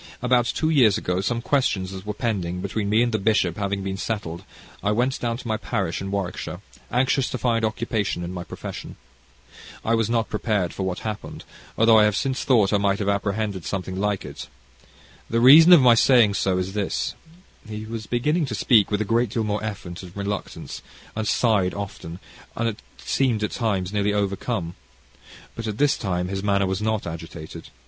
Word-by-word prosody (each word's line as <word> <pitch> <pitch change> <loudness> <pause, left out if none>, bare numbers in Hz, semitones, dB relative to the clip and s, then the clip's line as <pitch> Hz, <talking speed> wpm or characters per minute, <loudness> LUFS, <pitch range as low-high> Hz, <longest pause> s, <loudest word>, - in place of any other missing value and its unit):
About 125 -1 +2
two 155 +5 0
years 120 - +5
ago, 90 +1 -1
some 115 +3 -2
questions 105 -11 0
that 95 +1 -8
were 105 - -3
pending 95 -6 -2
between 100 +2 -2
me 110 +3 +4
and 120 - 0
the 110 - 0
bishop 95 -4 +1
having 100 -1 -2
been 95 0 -3
settled, 95 -6 -4 0.4
I 105 - +2
went 125 +5 0
down 115 -1 -2
to 125 - -9
my 110 -1 0
parish 95 -9 -2
in 95 - -4
Warwickshire, 95 -2 -4 0.3
anxious 130 +1 +1
to - - -3
find 115 -2 0
occupation 110 -4 -1
in 85 +1 -5
my 90 -1 -5
profession. - - -8 0.9
I 115 - +2
was 115 -1 +1
not 115 -1 +1
prepared 105 -4 -1
for - - -6
what 95 -1 -2
happened, 105 -1 -5 0.3
although 115 0 +6
I 105 - +6
have 105 -1 +2
since 130 -1 -1
thought 110 -6 +3
I 105 - +3
might 100 -1 +1
have 100 -1 -1
apprehended 100 -1 -1
something 95 0 -4
like 105 -1 -1
it. - - -8 0.8
The 115 - +1
reason 150 +8 +9
of 175 -5 +9
my 125 -2 +7
saying 115 -3 +5
so 95 -2 +1
is 95 +1 -2
this 105 -2 -2 0.3
" 180 - -22
He 110 0 -6
was 110 -1 -6
beginning 150 +6 0
to 115 - -3
speak 105 0 +4
with 105 0 0
a - - 0
great 115 +2 +1
deal 115 +2 -1
more 105 0 -2
effort 95 -5 -6
and 90 0 -11
reluctance, 100 0 -5 0.3
and 110 -1 -2
sighed 100 -7 +2
often, 95 -4 -6 0.4
and 115 -2 -1 0.2
seemed 120 -6 0
at 105 - -1
times 100 -5 -1
nearly 105 0 +1
overcome. 100 -2 -2 0.8
But 115 -1 -6
at 105 -1 -3
this 145 +1 +3
time 90 -3 -2
his 95 0 -3
manner 100 -1 +2
was 95 +1 -2
not 110 -1 -1
agitated. 80 -1 -8
105 Hz, 195 wpm, -24 LUFS, 95-115 Hz, 0.9 s, reason